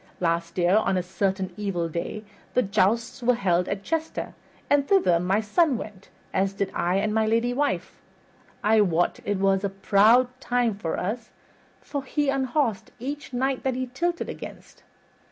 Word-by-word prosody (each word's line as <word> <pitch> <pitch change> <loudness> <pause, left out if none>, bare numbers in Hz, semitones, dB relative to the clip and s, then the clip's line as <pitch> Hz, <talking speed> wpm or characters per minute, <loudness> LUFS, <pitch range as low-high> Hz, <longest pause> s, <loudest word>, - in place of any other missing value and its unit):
Last 170 0 -1
year, 180 +3 +4
on 195 -3 +2
a 180 - 0
certain 190 0 -1
evil 195 -5 -1
day, 170 +6 -4 0.3
the 250 - +4
jousts 210 +6 +1
were 245 +1 +3
held 180 -4 +1
at 200 0 -3
Chester, 325 +4 -3 0.3
and 285 -1 +3
thither 265 - +4
my 190 +4 +1
son 270 - +2
went, 200 -3 -9 0.2
as 195 0 +1
did 195 -1 -2
I 175 +1 0
and 210 +2 +1
my 220 0 +2
lady 230 +2 +2
wife. 285 +3 -2 0.6
I 215 +1 +5
wot 175 -3 +1
it 205 -1 0
was 195 0 +2
a 200 - 0
proud 210 +6 +4
time 245 -3 +1
for 185 -5 -3
us, 220 +4 -3 0.5
for 280 -2 -4
he 290 +1 0
unhorsed 260 -5 0
each 280 +4 -6
knight 260 +1 0
that 265 -2 -1
he 255 -1 -3
tilted 345 +5 -1
against. - - -9
215 Hz, 170 wpm, -25 LUFS, 190-255 Hz, 0.6 s, I